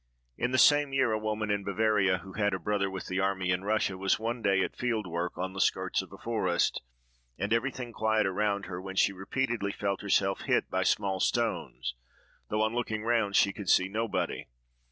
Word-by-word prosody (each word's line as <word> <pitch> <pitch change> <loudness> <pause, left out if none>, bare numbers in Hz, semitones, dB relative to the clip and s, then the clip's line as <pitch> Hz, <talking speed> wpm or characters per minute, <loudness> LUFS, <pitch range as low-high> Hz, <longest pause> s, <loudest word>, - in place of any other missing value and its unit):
In 120 - -1
the 130 - +1
same 145 0 +5
year, 130 -4 +2
a 110 - 0
woman 110 0 -2
in 100 -1 0
Bavaria, 100 -2 +2
who 95 0 -11
had 105 -2 +1
a - - -4
brother 100 +2 0
with 95 -1 -6
the 95 +1 -2
army 95 -1 0
in 90 +1 0
Russia, 100 -2 0
was 95 +1 +2
one 115 +2 -3
day 95 -2 +3
at - - -4
field 115 -4 -1
work, 85 0 -3
on 95 +1 -3
the 95 - -2
skirts 95 0 +1
of 95 - -12
a 100 - -10
forest, 95 -7 0 0.6
and 100 +5 -1
everything 120 0 -2
quiet 110 0 +1
around 100 +1 0
her, 90 -1 -6
when 95 0 -7
she 100 - +3
repeatedly 105 +2 -2
felt 100 -1 -2
herself 95 -1 +1
hit - - 0
by - - +1
small 95 -2 +1
stones, 95 - -1 0.6
though, 105 +1 +1
on 110 +1 0
looking 110 -3 -2
round, 110 -3 +1
she 100 - +4
could 100 -3 -6
see 95 - +5
nobody. 110 +2 -2
100 Hz, 205 wpm, -29 LUFS, 95-110 Hz, 0.6 s, same